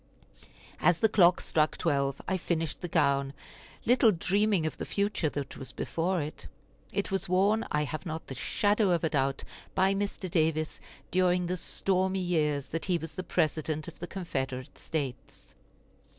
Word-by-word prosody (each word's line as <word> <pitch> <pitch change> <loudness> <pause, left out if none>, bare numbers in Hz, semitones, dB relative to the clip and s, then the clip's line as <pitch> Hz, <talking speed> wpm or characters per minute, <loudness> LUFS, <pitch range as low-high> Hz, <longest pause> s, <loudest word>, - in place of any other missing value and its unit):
As 175 -2 +4
the 220 - +5
clock 180 -3 +5
struck 155 -1 +1
twelve 140 -1 0
I 190 - +1
finished 165 -4 -2
the 175 - -3
gown, 140 -4 +2 0.5
little 240 -2 +6
dreaming 195 0 +1
of 155 - -2
the - - -4
future 200 -5 0
that 145 -1 -5
was 135 -1 -5
before 175 +6 -1
it. 150 - -8 0.4
It 200 0 -2
was 195 -1 -1
worn, 200 +5 +3
I 150 0 +1
have 155 +1 -4
not 160 -1 -5
the - - -7
shadow 205 - +1
of 175 -2 +2
a 160 - +1
doubt, 135 -1 0 0.3
by 190 +1 +4
Mr. 200 -1 -2
Davis 155 -2 0 0.3
during 180 0 +3
the 180 +1 -1
stormy 190 +1 0
years 150 -6 0
that 165 - -2
he 180 -2 +2
was 160 -1 -7
the 185 - -4
President 155 -2 -1
of - - -10
the 175 - -5
Confederate 135 -9 -4
States. 125 - -5
165 Hz, 165 wpm, -29 LUFS, 150-190 Hz, 0.5 s, little